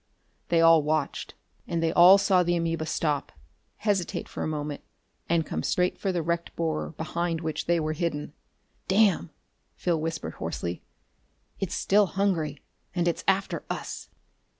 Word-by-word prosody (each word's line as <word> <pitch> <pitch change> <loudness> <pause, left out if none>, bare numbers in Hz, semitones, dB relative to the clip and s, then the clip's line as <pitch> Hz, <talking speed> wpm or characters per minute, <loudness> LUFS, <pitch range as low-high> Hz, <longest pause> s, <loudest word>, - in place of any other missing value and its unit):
They 165 -1 +4
all 165 -1 +7
watched. 150 0 -2 0.3
And 165 -1 -1
they 165 - +2
all 180 +3 +9
saw 190 -2 +3
the 175 0 +1
amoeba 165 -2 -1
stop, 150 -3 -1 0.5
hesitate 200 -5 -1
for - - -7
a - - -1
moment 150 -2 -4 0.5
and 165 -1 +2
come 80 - -3
straight 180 - +1
for 195 - 0
the 175 -3 -1
wrecked 170 +1 -2
borer 160 -2 -1
behind 165 +1 -2
which 155 -2 -3
they 170 0 +3
were 155 0 -1
hidden. 150 -3 -3 0.5
"Damn!" 195 - +3 0.5
Phil 170 -3 0
whispered 160 - -3
hoarsely. 85 +2 -4 0.8
"It's 195 - -2
still 205 0 +3
hungry 170 -7 -1 0.3
and 175 -1 +1
it's 170 - -1
after 195 0 +1
us!" - - -5
165 Hz, 150 wpm, -27 LUFS, 155-175 Hz, 0.8 s, all